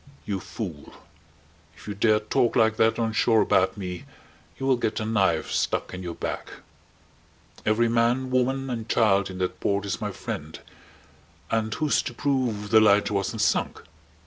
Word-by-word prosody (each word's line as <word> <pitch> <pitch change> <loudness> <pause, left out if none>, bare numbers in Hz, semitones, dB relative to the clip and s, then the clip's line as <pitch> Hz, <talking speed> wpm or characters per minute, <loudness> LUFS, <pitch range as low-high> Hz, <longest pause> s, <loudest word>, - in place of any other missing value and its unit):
"You 100 -2 -2
fool, 90 -8 -7 0.8
if - - -15
you 105 - -3
dare 105 +1 +3
talk 120 +3 0
like 110 0 +3
that 115 0 +3
on 115 -1 -1
shore 110 0 +3
about 95 +1 +2
me 90 -3 -6 0.5
you 135 - -4
will 135 -1 +4
get 115 -3 -2
a 110 - -3
knife 105 -3 +1
stuck - - -1
in 90 - -6
your 85 -2 -5
back. - - -5 1.1
Every 110 +2 +3
man, 120 +3 +1
woman, 130 +1 0
and 115 -2 -5
child 100 -4 +3
in 95 - -7
that 90 -1 -3
port 100 0 0
is 100 - -3
my 105 -1 -2
friend. 80 -4 -6 0.9
And 110 -1 0
who's 155 -2 +1
to 120 - -7
prove 120 -8 -1
the 110 - +7
lighter 105 0 +4
wasn't 105 +3 -1
sunk? - - 0
110 Hz, 170 wpm, -25 LUFS, 100-120 Hz, 1.1 s, the